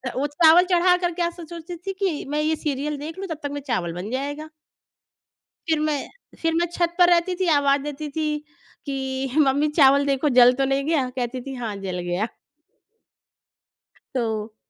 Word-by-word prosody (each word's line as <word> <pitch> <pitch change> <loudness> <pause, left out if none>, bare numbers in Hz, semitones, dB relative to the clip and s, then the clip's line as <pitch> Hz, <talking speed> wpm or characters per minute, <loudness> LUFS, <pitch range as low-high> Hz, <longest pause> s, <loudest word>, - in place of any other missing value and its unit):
वो 275 +3 0
चावल 325 +4 +5
चढ़ा 360 0 +4
कर 355 -1 -1
के 350 - -4
ऐसा 345 0 -2
सोचती 335 +1 -8
थी 390 +3 -5
कि 375 -5 -2
मैं 300 +1 0
ये 310 +1 +1
सीरियल 295 0 -3
देख 310 +4 -7
लूँ 390 - -4
तब 325 - -4
तक 285 - -3
में 285 0 -5
चावल 180 -9 -1
बन 180 +4 -6
जाएगा। 290 +4 -4 1.2
फिर 320 -1 +2
मैं 305 -1 0 0.4
फिर 330 0 +1
मैं 340 +1 +2
छत 345 -1 0
पर 355 -1 +6
रहती 350 +1 +2
थी 370 0 -1
आवाज़ 280 0 +2
देती 295 +1 -5
थी 310 +2 -2 0.6
कि 265 -1 -3
"मम्मी 285 +1 +3
चावल 280 -1 +6
देखो। 280 +1 +1
जल 245 0 +8
तो 270 - +3
नहीं 270 +1 0
गया?" 295 -5 +1
कहती 250 0 -3
थी 270 +2 -7
"हाँ, 220 -3 -3
जल 180 -1 -3
गया।" 175 +4 -2 1.9
तो 220 -3 -2
290 Hz, 185 wpm, -23 LUFS, 265-330 Hz, 1.9 s, जल